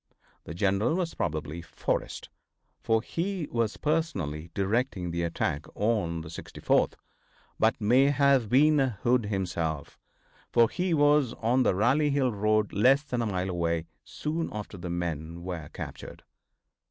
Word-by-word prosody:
The 80 - -7
general 100 - +1
was 175 -2 -1
probably 75 +1 -3
Forrest, - - -3 0.5
for 110 0 +1
he 175 0 -3
was 115 -2 0
personally 95 - -1
directing 100 -3 0
the 85 0 -2
attack 80 -3 -2
on 100 -7 0
the 80 - -9
64th, 80 - 0 0.7
but - - +2
may 125 +6 +4
have 140 -5 +3
been 150 +5 +5
Hood 125 -2 +1
himself, 85 -7 -3 0.5
for 115 -2 +5
he 180 -2 0
was 145 -4 +4
on 120 +3 +1
the 110 - +2
Rally 135 +9 +3
Hill 140 -3 +1
road, 105 +1 +1
less 135 +8 +4
than 125 -4 -2
a 115 - 0
mile 95 -2 -2
away, 85 -1 -1 0.2
soon 160 +2 -3
after 105 -1 -6
the 90 -1 -6
men 85 -1 -4
were 85 -4 -5
captured. - - -8
105 Hz, 140 wpm, -28 LUFS, 85-135 Hz, 0.7 s, been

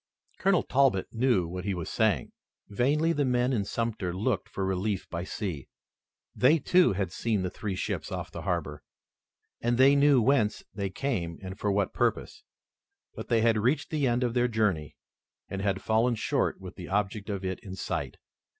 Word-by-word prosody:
Colonel 195 -2 +3
Talbot 130 -8 +2
knew 115 -7 +2
what 90 +2 -5
he 100 -1 -1
was 85 -2 -5
saying. - - +1 0.4
Vainly 145 +10 +1
the 145 - +1
men 125 0 +1
in 105 -5 +1
Sumter 110 -3 -2
looked 105 0 -1
for 95 - -3
relief 95 +1 -1
by 85 0 -3
sea. 90 -7 -5 0.7
They, 140 +6 +4
too, 175 - +4
had 95 -2 -2
seen 100 +5 -1
the 90 - -2
three 100 -2 -4
ships - - -3
off - - -5
the - - -7
harbor, 75 0 -2 0.8
and 120 0 +1
they 135 +2 +6
knew 140 -1 +5
whence 115 -3 +2
they 100 -1 -2
came 95 -8 -2
and 95 0 -7
for 105 - 0
what 100 -1 0
purpose. - - -1 0.7
But - - -7
they 115 -1 +2
had 115 -1 +3
reached 130 +7 0
the 150 -4 +1
end 120 +1 +1
of 120 -2 0
their 125 0 +2
journey, 105 - 0 0.5
and 95 - -4
had 100 -1 -1
fallen 115 +2 +2
short - - 0
with 95 -1 -10
the 90 -3 -7
object 100 +1 -1
of 100 -2 -3
it 95 0 -2
in 95 -2 -8
sight. - - -4
105 Hz, 185 wpm, -28 LUFS, 95-125 Hz, 0.8 s, they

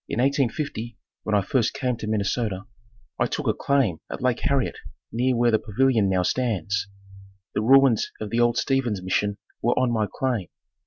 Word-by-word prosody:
In - - -2
1850 130 -3 -1 0.2
when 105 - -1
I 100 - +3
first 120 +2 0
came 125 -2 -1
to 110 - -6
Minnesota, 105 -1 -1 0.6
I - - +2
took - - -4
a - - +2
claim 130 - +1
at - - -5
Lake 125 -1 +1
Harriet 135 -3 0 0.3
near 125 +2 +1
where 120 0 +3
the 110 - +3
pavilion 110 -1 +2
now 95 -1 +2
stands. 100 -4 -1 0.7
The - - 0
ruins 130 0 +5
of 105 -1 -5
the 115 - 0
old 120 0 +3
Steven's 125 -8 0
Mission 100 +2 0 0.2
were 120 +2 +1
on 125 -2 +2
my 110 -2 +1
claim. 120 -9 -1
115 Hz, 175 wpm, -24 LUFS, 105-130 Hz, 0.7 s, ruins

